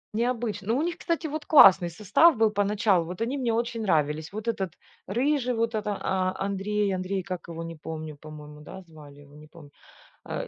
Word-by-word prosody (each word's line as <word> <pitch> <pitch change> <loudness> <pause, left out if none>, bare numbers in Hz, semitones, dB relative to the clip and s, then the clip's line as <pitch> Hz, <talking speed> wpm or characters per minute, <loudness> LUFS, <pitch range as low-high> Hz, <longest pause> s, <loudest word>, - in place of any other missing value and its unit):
Необычно. 230 -4 -2
Ну, 230 +3 +1
у - - 0
них, 345 +1 -3
кстати, 335 -1 -2
вот 300 0 -6
классный 190 - +7
состав 215 - +3
был 220 -1 +3
поначалу, 205 -3 +1
вот 180 +4 -8
они 240 +4 -1
мне 250 -4 -1
очень 230 0 -2
нравились. 155 -5 0
Вот 215 +2 -6
этот 190 -7 -2 0.3
рыжий, 250 +3 0
вот 230 +1 -1
это 210 -2 -2
а 185 -1 -1
Андрей 200 +1 -1
Андрей, 185 +1 -3
как 180 -1 -6
его, 165 0 -6
не 165 0 -7
помню, 155 -1 -7
по-моему, 150 0 -12
да, 190 +5 -10
звали 150 -4 -15
его, 145 0 -18
не 150 +1 -14
помню, 155 -2 -15 0.5
а, - - -5
195 Hz, 195 wpm, -26 LUFS, 165-230 Hz, 0.5 s, классный